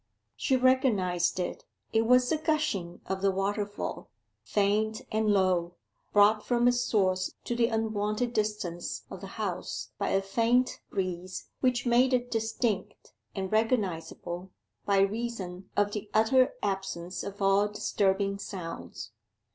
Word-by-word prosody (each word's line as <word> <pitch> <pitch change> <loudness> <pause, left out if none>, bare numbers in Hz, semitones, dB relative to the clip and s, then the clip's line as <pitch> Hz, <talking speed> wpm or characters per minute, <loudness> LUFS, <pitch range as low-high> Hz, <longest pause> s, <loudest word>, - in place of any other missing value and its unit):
She 265 - +1
recognized 205 -10 +2
it: 180 - -3 0.3
it 225 0 +3
was 250 +1 +5
the 315 - +1
gushing 305 - -1
of 190 0 -3
the 200 - +3
waterfall, 200 +2 -2 0.3
faint 210 +2 +1
and 220 0 +1
low, 185 -3 +2 0.4
brought 210 +1 +5
from 240 0 +2
its 245 0 +3
source 185 -6 +1
to 240 - -2
the 235 -1 +3
unwonted 220 +1 -1
distance 210 -6 -2
of 190 - -7
the 195 +2 -9
House 205 -5 -3
by - - 0
a 195 0 +2
faint 235 +5 +2
breeze 185 -1 -4
which 250 -1 +1
made 250 +2 +4
it 245 0 -2
distinct 220 -2 -2 0.2
and 190 -1 -3
recognizable 185 -5 -1 0.4
by 200 -1 +4
reason 195 -3 -2
of 205 0 +3
the 210 0 -5
utter 255 +4 +4
absence 190 -3 -3
of 200 0 -7
all 195 +1 +4
disturbing 200 -1 0
sounds. 180 -4 -7
205 Hz, 135 wpm, -29 LUFS, 190-230 Hz, 0.4 s, was